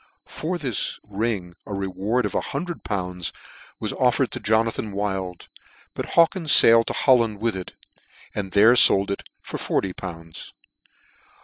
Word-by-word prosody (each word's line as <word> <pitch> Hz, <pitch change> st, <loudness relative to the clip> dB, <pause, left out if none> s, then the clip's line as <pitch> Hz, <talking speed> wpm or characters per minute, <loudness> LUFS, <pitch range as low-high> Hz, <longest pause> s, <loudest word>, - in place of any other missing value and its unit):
For 175 Hz, +4 st, -4 dB
this 130 Hz, -, -2 dB
ring 100 Hz, -4 st, -3 dB
a 100 Hz, -, -4 dB
reward 100 Hz, +5 st, -1 dB
of 105 Hz, -, -4 dB
lool. 105 Hz, -, -4 dB, 0.6 s
was -, -, -3 dB
offered -, -, +1 dB
to -, -, -5 dB
Jonathan 110 Hz, -1 st, 0 dB
Wild; 95 Hz, -3 st, -4 dB, 0.5 s
but -, -, -5 dB
Haw 170 Hz, -, +8 dB
kins 165 Hz, -3 st, +5 dB
failed 115 Hz, 0 st, +6 dB
to -, -, -2 dB
Holland 115 Hz, -6 st, +2 dB
with 115 Hz, -1 st, -1 dB
it, 95 Hz, -1 st, -7 dB, 0.6 s
and 95 Hz, -2 st, -4 dB
there 110 Hz, +5 st, +6 dB
fold 100 Hz, -5 st, +5 dB
it 100 Hz, -, -6 dB
for -, -, -6 dB
forty 95 Hz, -2 st, -1 dB
pounds. 85 Hz, -3 st, -9 dB
105 Hz, 140 wpm, -23 LUFS, 95-115 Hz, 0.6 s, Haw